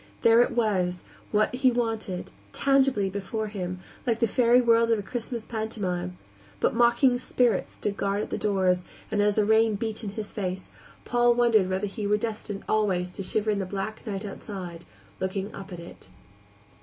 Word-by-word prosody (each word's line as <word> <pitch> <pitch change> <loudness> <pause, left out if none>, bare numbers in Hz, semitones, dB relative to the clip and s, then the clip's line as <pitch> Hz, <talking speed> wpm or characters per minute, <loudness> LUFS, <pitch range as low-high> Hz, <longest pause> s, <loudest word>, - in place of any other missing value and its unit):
There 230 +1 +7
it - - +3
was, 185 -6 0 0.3
what 215 +2 +2
he 260 +1 +4
wanted 225 -6 -2 0.2
tangibly 270 -7 +3
before 205 +3 -3
him, 185 -3 -4 0.3
like 230 -2 +1
the - - +4
fairy 240 +2 +4
world 230 -1 +4
of 230 - +4
a 205 - -4
Christmas 235 +1 -4
pantomime 185 -6 -3 0.4
but - - +2
mocking 240 +2 +4
spirits 245 -5 +1
stood 205 -1 -3
guard 200 +1 0
at - - -7
the - - -1
doors, 185 -3 +2 0.3
and, 205 - +2
as 205 0 +3
the 215 - +3
rain 220 0 +4
beat 220 +1 -4
in 210 - -3
his 210 -1 -5
face, 185 -2 -4 0.3
Paul 240 0 +3
wondered 230 -6 +4
whether 190 +2 0
he 205 +1 -4
were 210 +1 +3
destined 210 -2 -4
always 190 -4 +1
to 190 - -7
shiver 215 +3 0
in 205 - 0
the 195 - -1
black 200 +3 -4
night 200 0 -3
outside, 185 -4 -7 0.3
looking 190 +2 -3
up 195 - -9
at 175 - -7
it. 170 - -12
210 Hz, 180 wpm, -27 LUFS, 195-230 Hz, 0.4 s, There